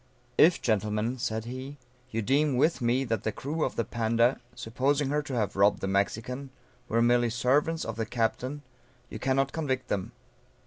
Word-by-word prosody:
_] - - -34 0.3
If, 165 +6 +5
gentlemen, 110 +2 0
said 110 -1 -2
he, 130 +4 -7 0.3
you 115 -2 -2
deem 140 +3 +2
with 155 +2 +2
me, 120 +3 +2
that 115 -5 -1
the 110 - -1
crew 150 +8 -3
of - - -1
the 115 - 0
Panda, 115 +3 +1
(supposing 135 +5 0
her 150 +1 +1
to 145 -3 -5
have 105 -4 -1
robbed 100 +1 +4
the - - -3
Mexican,) 110 +7 -1 0.4
were 115 0 +2
merely 120 0 +3
servants 140 +7 +1
of 115 -1 -5
the 110 -1 -2
captain, 125 +5 -2 0.5
you - - -6
cannot 135 0 +1
convict 135 -5 -2
them. 95 -2 -2
125 Hz, 180 wpm, -28 LUFS, 110-135 Hz, 0.5 s, If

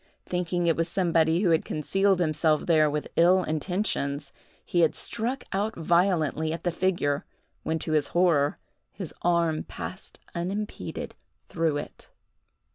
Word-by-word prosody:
Thinking 180 0 -1
it 165 -2 +3
was 165 +1 0
somebody 165 -2 +2
who 185 -5 +3
had 160 - +3
concealed 195 +5 +1
himself 155 -2 +2
there 155 -3 +4
with 150 0 -3
ill 180 +2 +5
intentions, 155 -4 -2 0.3
he 175 - 0
had 165 -2 +4
struck 240 +3 -3
out 210 +3 -1
violently 165 -2 +1
at 165 - -4
the 175 - +1
figure, 170 -5 0 0.4
when, 160 - -1
to 160 - -3
his 155 -2 +2
horror, 165 -5 +2 0.3
his 185 -6 -7
arm 170 -2 +2
passed 185 - -7
unimpeded 195 +5 -4 0.4
through 165 -3 0
it. 145 - -8
170 Hz, 140 wpm, -27 LUFS, 155-185 Hz, 0.4 s, ill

